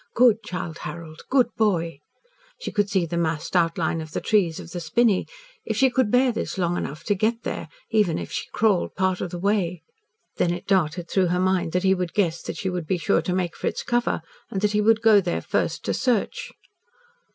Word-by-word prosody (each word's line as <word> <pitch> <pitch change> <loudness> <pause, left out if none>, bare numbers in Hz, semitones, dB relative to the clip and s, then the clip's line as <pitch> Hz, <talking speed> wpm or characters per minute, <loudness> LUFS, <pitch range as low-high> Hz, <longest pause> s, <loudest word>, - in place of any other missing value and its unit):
Good 230 -2 +5
Childe 175 -5 -5
Harold, 155 0 -8
good 255 -3 +4
boy! 170 -8 0 0.6
She - - -5
could 205 -2 +1
see 190 -3 +1
the 170 +1 -3
massed 160 +1 -2
outline 165 -1 +1
of 155 -1 -9
the - - -1
trees 185 -7 +1
of 165 - -10
the 175 - -4
spinney. 195 +5 +2 0.4
If - - -3
she 265 -1 +4
could 250 -3 +2
bear 250 +2 +4
this 220 - -4
long 175 -2 0
enough 150 -3 -4
to 205 - +1
get 220 +4 0
there - - -4 0.2
even 210 -7 +2
if - - -6
she - - -3
crawled 210 -5 +1
part 185 -1 0
of 180 - -2
the 175 - -5
way. 180 -2 0 0.5
Then 175 - +2
it 175 - -4
darted 175 -3 +1
through 185 +1 +2
her 180 +1 0
mind 185 -3 +1
that 180 +1 +1
he 190 0 +4
would 180 -3 -3
guess 170 -5 +1
that - - -6
she 190 - -3
would 180 -3 -3
be 185 - +1
sure 195 +4 +2
to 180 - -2
make 180 -2 -1
for - - -3
its - - -2
cover, 240 -8 0 0.3
and 190 - -3
that 210 -1 +2
he 210 0 +2
would 225 +1 +3
go 215 -2 +7
there 175 -2 -1
first - - -2
to - - 0
search. 270 - 0
185 Hz, 220 wpm, -24 LUFS, 170-215 Hz, 0.6 s, go